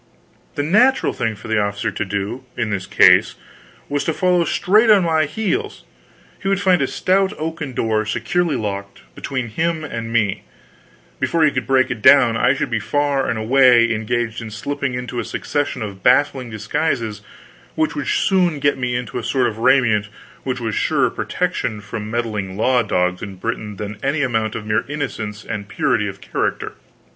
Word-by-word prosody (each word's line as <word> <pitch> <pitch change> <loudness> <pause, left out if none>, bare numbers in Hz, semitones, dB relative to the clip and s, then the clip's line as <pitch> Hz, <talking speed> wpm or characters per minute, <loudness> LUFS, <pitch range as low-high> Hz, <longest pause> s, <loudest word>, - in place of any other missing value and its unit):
The 145 - -1
natural 245 - +3
thing 110 -2 -2
for 105 - -11
the 110 -1 +1
officer 100 +2 -2
to 100 - -3
do, 100 +5 -4
in 110 -3 -1
this 95 -2 -3
case, - - +5 0.5
was 145 0 -1
to 160 - 0
follow 180 -2 +2
straight 210 +7 +3
on 205 -3 +6
my 160 -2 +2
heels; 220 - -3 0.6
he 195 - -4
would 195 -1 +2
find 185 -3 +3
a - - +1
stout 190 +1 +1
oaken 160 -3 -4
door, 110 -2 0
securely 145 - 0
locked, 100 -4 -5
between 130 - -4
him 160 +7 -1
and 115 -6 -5
me; 110 -4 +1 0.8
before 165 -1 +1
he 155 - +4
could 130 -3 -3
break 130 -1 +3
it 115 - -4
down, 130 -2 +6
I 125 +4 +3
should 130 - -3
be 115 - +1
far 140 +4 0
away 120 +1 +4
and 115 0 +1
engaged 115 +1 -2
in 115 - -7
slipping 140 +4 -3
into 125 0 -4
a - - -1
succession 145 0 -3
of 100 -2 -7
baffling 130 0 +2
disguises 110 0 -2 0.5
which 155 0 0
would 145 -2 -4
soon 180 -5 +2
get 145 -1 +1
me 125 -1 -1
into 125 0 -3
a - - -7
sort 130 +2 +1
of 110 -2 -2
raiment 115 -4 +3 0.3
which 130 -1 -3
was 110 -2 -3
a - - -2
surer - - +1
protection 105 - -2
from 105 +1 -6
meddling 105 -5 -3
law 125 +3 +3
dogs 90 -4 0
in 100 -2 -7
Britain 105 +1 -4
than 105 +1 -6
any 140 +2 0
amount 110 -4 -1
of 110 - -5
mere 105 0 +1
innocence 110 -8 -5
and 100 -1 -5
purity - - 0
of - - -8
character. - - -2
120 Hz, 185 wpm, -20 LUFS, 110-145 Hz, 0.8 s, on